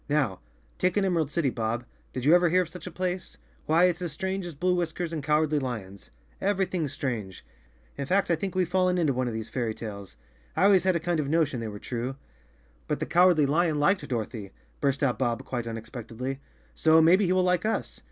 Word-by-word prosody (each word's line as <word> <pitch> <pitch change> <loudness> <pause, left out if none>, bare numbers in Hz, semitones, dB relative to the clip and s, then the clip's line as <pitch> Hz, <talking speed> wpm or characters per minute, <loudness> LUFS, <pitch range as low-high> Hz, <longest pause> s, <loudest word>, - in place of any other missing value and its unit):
Now 140 -11 +1 0.4
take 185 +2 +1
an 200 - +3
Emerald 165 -6 +1
City, 150 -4 0
Bob; 115 +1 -2 0.3
did 125 0 -4
you 155 - +6
ever 175 -1 +5
hear 185 +2 +4
of 170 - -10
such 180 +1 -9
a - - -6
place? 180 +1 -3 0.3
Why, 165 +3 +4
it's 180 -1 +1
as 175 -3 -3
strange 190 +3 -3
as 170 - -8
blue 180 +5 +1
whiskers 170 -1 -2
and 155 - -2
cowardly 150 0 +2
lions. 105 -7 -6 0.3
Everything's 190 -6 0
strange. 110 - -4 0.5
In 140 - -3
fact, 190 +1 +2
I - - +4
think 190 +3 -4
we've 185 -2 +2
fallen 185 0 +2
into 155 -5 +2
one 130 0 -1
of 120 - -3
these 110 0 -4
fairy 115 -3 -2
tales. 100 - -8 0.4
I - - +3
always 195 -2 +5
had 185 -1 +3
a - - +2
kind 170 0 -1
of 140 -2 -1
notion 150 -5 +1
they 115 - -4
were 105 -1 -6
true!" 125 +4 -4 0.7
"But 150 - -1
the 155 - -1
Cowardly 175 -3 +5
Lion 155 +1 +2
liked 150 +7 +2
Dorothy," 110 -4 -4 0.3
burst 140 0 0
out 125 -3 +1
Bob 120 -3 -1
quite 120 -2 -3
unexpectedly, 115 +3 -5 0.3
"so 160 0 +5
maybe 180 +5 +5
he 180 - +2
will 185 0 +3
like 180 -1 +2
us." 220 +1 -2
155 Hz, 215 wpm, -27 LUFS, 125-180 Hz, 0.7 s, you